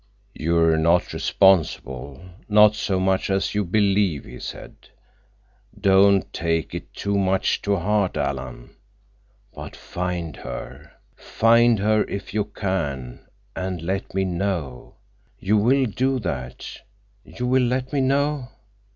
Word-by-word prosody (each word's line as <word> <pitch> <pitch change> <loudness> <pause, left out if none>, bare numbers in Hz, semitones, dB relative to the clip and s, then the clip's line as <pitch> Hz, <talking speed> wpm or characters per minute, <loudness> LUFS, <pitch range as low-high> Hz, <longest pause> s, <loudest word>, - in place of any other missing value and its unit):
"You're 80 0 +2
not 85 +2 +2
responsible—not 95 - +2
so 100 -3 -1
much 95 +1 0
as 95 0 0
you 105 0 0
believe," 100 -4 +1
he 60 0 -10
said. - - -8 1.0
"Don't 100 0 +4
take 80 -1 -1
it - - -7
too 100 0 -2
much 95 0 +1
to 100 0 0
heart, 100 +1 0
Alan. 65 -3 -4 0.8
But - - -9
find 90 -3 -4
her. - - -8 0.2
Find 115 +1 +3
her 105 +1 +2
if 100 -1 -6
you 105 -1 0
can, 75 - -4 0.3
and 90 -3 -4
let 95 +2 -3
me 95 0 +1
know. 85 -8 -3 0.4
You 105 +3 +1
will 130 +6 +3
do 130 +4 0
that—you 100 - -7
will 130 +1 +3
let 130 +3 -2
me 140 - +1
know?" 140 0 0
95 Hz, 120 wpm, -23 LUFS, 85-105 Hz, 1.0 s, Don't